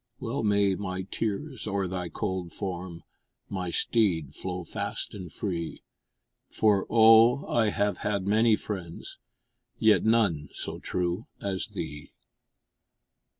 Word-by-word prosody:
Well 130 Hz, +2 st, -2 dB
may 100 Hz, -2 st, +3 dB
my 95 Hz, -1 st, -3 dB
tears 115 Hz, +6 st, -3 dB
o'er 100 Hz, -2 st, 0 dB
thy 90 Hz, -1 st, -4 dB
cold 90 Hz, -1 st, -3 dB
form, 90 Hz, -2 st, -5 dB, 0.5 s
My 95 Hz, -3 st, -3 dB
steed, 85 Hz, -, +1 dB
flow 90 Hz, -1 st, -4 dB
fast -, -, -4 dB
and 90 Hz, -5 st, -8 dB
free, 85 Hz, -5 st, -4 dB, 0.7 s
For, 105 Hz, -3 st, +2 dB
oh! 115 Hz, +4 st, +6 dB
I 115 Hz, -2 st, +2 dB
have 100 Hz, 0 st, 0 dB
had 100 Hz, -2 st, -1 dB
many 110 Hz, +2 st, +4 dB
friends, 90 Hz, -6 st, -6 dB, 0.6 s
Yet 110 Hz, -1 st, +4 dB
none 100 Hz, -10 st, +2 dB
so -, -, -5 dB
true 90 Hz, +3 st, -2 dB
as 95 Hz, -2 st, -2 dB
thee! 75 Hz, -5 st, -6 dB
100 Hz, 120 wpm, -28 LUFS, 90-110 Hz, 0.7 s, oh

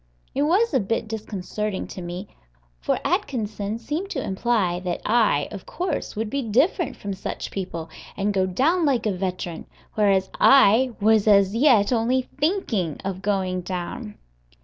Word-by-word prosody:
It 275 Hz, -, -1 dB
was 365 Hz, +8 st, +2 dB
a 265 Hz, -, +4 dB
bit 220 Hz, +1 st, -2 dB
disconcerting 210 Hz, -2 st, -4 dB
to 185 Hz, -, -7 dB
me, 175 Hz, +3 st, -6 dB, 0.5 s
for -, -, 0 dB
Atkinson 215 Hz, -3 st, -1 dB
seemed 300 Hz, -, -4 dB
to 300 Hz, -, -3 dB
imply 190 Hz, -3 st, 0 dB
that 180 Hz, -1 st, -3 dB
I, 215 Hz, -11 st, +3 dB
of 200 Hz, -, -9 dB
course, 350 Hz, -4 st, -3 dB
would 220 Hz, +1 st, -2 dB
be 275 Hz, +5 st, -2 dB
different 270 Hz, -, +1 dB
from 200 Hz, -1 st, -5 dB
such 190 Hz, -, -5 dB
people, 175 Hz, -4 st, -5 dB, 0.3 s
and 205 Hz, +1 st, 0 dB
go 190 Hz, -1 st, +1 dB
down 310 Hz, -, +2 dB
like 260 Hz, -7 st, +1 dB
a 210 Hz, -, +2 dB
veteran, 180 Hz, -2 st, -4 dB, 0.3 s
whereas 195 Hz, -3 st, +2 dB
I 255 Hz, -1 st, +6 dB
was 220 Hz, 0 st, +3 dB
as 200 Hz, -1 st, +5 dB
yet 235 Hz, -3 st, +4 dB
only 245 Hz, +3 st, +1 dB, 0.2 s
thinking 260 Hz, -, 0 dB
of 190 Hz, -1 st, -3 dB
going 190 Hz, -2 st, -1 dB
down! 190 Hz, +5 st, -5 dB
210 Hz, 155 wpm, -24 LUFS, 190-255 Hz, 0.5 s, I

